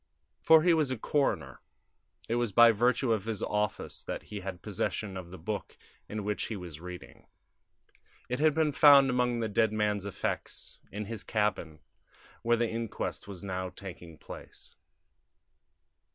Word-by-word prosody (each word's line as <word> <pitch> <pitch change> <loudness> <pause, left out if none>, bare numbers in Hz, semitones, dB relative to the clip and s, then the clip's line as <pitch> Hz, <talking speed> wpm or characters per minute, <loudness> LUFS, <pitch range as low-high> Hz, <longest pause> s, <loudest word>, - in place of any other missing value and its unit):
For 160 -1 +7
he 175 -1 +5
was 155 -4 +2
a 130 - -1
coroner. 140 +5 -1 0.7
It - - -1
was 120 -2 0
by 120 +4 +8
virtue 120 +2 +2
of 105 -2 -2
his 110 -3 -3
office 105 -1 -2
that - - -4
he 105 - -7
had 95 -2 -7
possession 100 0 -3
of 90 -2 -7
the 95 - -9
book 100 +6 -5 0.3
in 105 -1 -4
which 105 +1 -1
he 110 - -4
was 85 -4 -9
reading; 90 0 -10 1.0
it 125 +1 -2
had 155 0 +4
been 160 -2 +2
found 140 -2 +7
among 125 -1 +1
the 110 - 0
dead 110 +1 +2
man's 105 -2 0
effects 100 - -3
in 105 +1 -4
his 110 0 -6
cabin, 100 -8 -1 0.6
where 120 0 +2
the 120 0 +1
inquest 115 -3 -4
was 100 -3 -8
now 95 -1 -3
taking 90 -4 -10
place. - - -12
105 Hz, 160 wpm, -30 LUFS, 95-120 Hz, 1.0 s, by